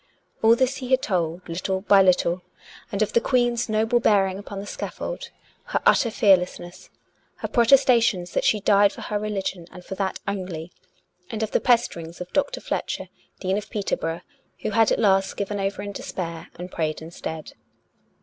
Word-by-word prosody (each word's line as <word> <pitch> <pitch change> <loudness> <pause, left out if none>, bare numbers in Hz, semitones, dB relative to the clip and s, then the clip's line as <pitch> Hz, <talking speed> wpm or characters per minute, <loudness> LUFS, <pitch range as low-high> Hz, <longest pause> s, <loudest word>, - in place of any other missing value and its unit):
All 225 +1 +6
this 260 +2 +1
he 255 -2 -6
had 260 0 +3
told, 175 -2 -1
little 185 +3 -2
by 200 0 +6
little; 180 -1 +3 0.5
and 205 0 +1
of 210 - -3
the 235 - +4
Queen's 240 -2 +1
noble 220 +2 +2
bearing 195 -4 +2
upon 200 -1 -7
the 200 - -6
scaffold, - - -5 0.4
her - - -1
utter 235 - +5
fearlessness, 185 -5 +1 0.5
her - - -4
protestations 235 -7 +4
that - - 0
she 215 - +3
died 200 0 +4
for - - -10
her 210 - -2
religion 195 -4 -3
and 180 - -12
for - - -6
that 190 0 -2
only, 180 -4 -4 0.6
and 220 -1 -3
of 220 - -3
the - - +1
pesterings 175 -9 +1
of 180 0 -8
Dr. 285 - 0
Fletcher, - - -3 0.3
Dean 190 +2 0
of 210 - -11
Peter 205 -2 -1
borough, 165 +1 -4 0.4
who - - -2
had 225 +1 +4
at - - +3
last 195 -3 +2
given 205 0 -2
over 195 0 -2
in 205 - -5
despair, 170 -4 -5
and 180 +1 -8
prayed 155 -2 -2
instead. 160 -1 -7
200 Hz, 180 wpm, -24 LUFS, 180-225 Hz, 0.6 s, All